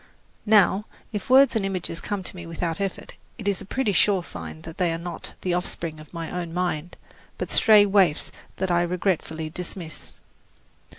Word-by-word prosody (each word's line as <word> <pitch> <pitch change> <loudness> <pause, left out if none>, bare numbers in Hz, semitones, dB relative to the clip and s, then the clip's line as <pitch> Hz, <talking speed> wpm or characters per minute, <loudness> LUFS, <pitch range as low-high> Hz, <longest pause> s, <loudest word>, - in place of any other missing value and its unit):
Now, 210 -1 +5 0.3
if 210 0 -5
words 265 -1 +7
and 220 - +1
images 185 -3 -3
come 205 -2 -3
to 180 - -6
me 175 -2 -8
without 165 +1 -3
effort, 195 -1 -4 0.2
it 215 -4 -6
is 200 -2 +1
a - - -8
pretty 220 0 0
sure 190 -1 +3
sign 80 - -8
that 165 - -9
they 175 -2 +2
are 165 - -1
not 175 +1 -7
the 180 - 0
offspring 170 -3 -3
of 155 - -13
my 165 -2 -5
own 175 -2 -4
mind, 175 -2 -2 0.4
but - - -4
stray 215 -3 +7
waifs 190 -6 +3 0.2
that 190 -1 -1
I 175 0 +4
regretfully 170 -3 -1
dismiss. 170 -2 -6
180 Hz, 180 wpm, -25 LUFS, 165-200 Hz, 0.4 s, words